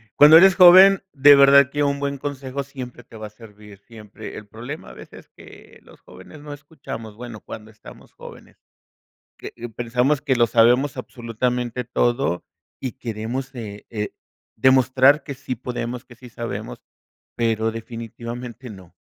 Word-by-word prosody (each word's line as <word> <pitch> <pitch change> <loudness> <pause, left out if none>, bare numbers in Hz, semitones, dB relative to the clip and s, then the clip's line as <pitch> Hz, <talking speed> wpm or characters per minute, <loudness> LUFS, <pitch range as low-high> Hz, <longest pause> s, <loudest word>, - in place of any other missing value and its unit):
cuando 150 +2 +8
eres 190 +2 +6
joven 190 +2 +8
de 145 0 +7
verdad 140 -1 +6
que 145 0 -1
un 140 0 -1
buen 140 0 -3
consejo 140 -1 -5
siempre 130 -3 -10
te 115 - -15
va 110 0 -7
a - - -14
servir, 105 -2 -16
siempre, 110 0 -12
el 105 - -11
problema 120 +9 -9
a - - -12
veces - - -14
que - - -16
los - - -19
jóvenes 95 +11 -15
no 145 0 -9
escuchamos, 135 -7 -10
bueno, 120 -1 -10
cuando 110 0 -11
estamos 110 - -16
jóvenes. - - -14 0.8
Que - - -9 0.2
pensamos 125 +4 0
que 140 -3 0
lo 120 -1 +3
sabemos 120 +4 +2
absolutamente 120 +1 -4
todo 120 -4 -1 0.4
y 130 -3 -5
queremos, 125 +2 -6
eh 105 -4 -9
eh, 105 -2 -4 0.5
demostrar 130 +3 +3
que 140 - -7
sí 130 -1 -6
podemos, 125 0 -6
que 120 - -16
sí 125 +1 -14
sabemos, 115 -2 -7 0.6
pero 115 -1 0
definitivamente 115 +2 -8
no. 95 -4 -14
125 Hz, 155 wpm, -21 LUFS, 115-140 Hz, 0.8 s, cuando